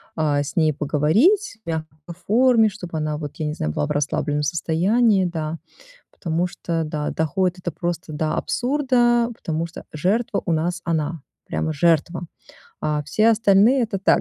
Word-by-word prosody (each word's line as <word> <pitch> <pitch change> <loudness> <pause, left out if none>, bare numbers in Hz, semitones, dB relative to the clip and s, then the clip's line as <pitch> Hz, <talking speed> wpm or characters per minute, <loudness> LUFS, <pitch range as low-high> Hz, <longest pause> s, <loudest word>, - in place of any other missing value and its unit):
а, 150 -2 +1
с 140 - -7
ней 155 -3 +3
поговорить 205 - +2
в - - -7
мягкой 160 -2 -4 0.3
форме, 230 0 +4
чтобы 180 -5 -7
она, 155 -1 -2
вот, 150 -2 -7
я 155 - -3
не 150 - -2
знаю, 75 - -2
была 145 - -1
в - - -4
расслабленном 145 0 -1
состоянии, 190 +7 +2
да, 160 -2 -3 0.5
потому 170 0 -2
что, 165 -2 -3
да, 150 -1 -3
доходит 180 +3 0
это 175 - -3
просто 170 -1 -4
до 155 +1 -1
абсурда, 245 -3 +1
потому 165 -3 -3
что 170 - -11
жертва 200 +8 0
у - - -2
нас 170 +2 -1
она, 160 -1 -1 0.3
прямо 160 - -2
жертва. 170 +2 +1 0.6
А 150 -1 -1
все 215 +9 +2
остальные- 220 +4 +4
это 215 -4 -2
так, 195 - +3
170 Hz, 165 wpm, -22 LUFS, 155-210 Hz, 0.6 s, форме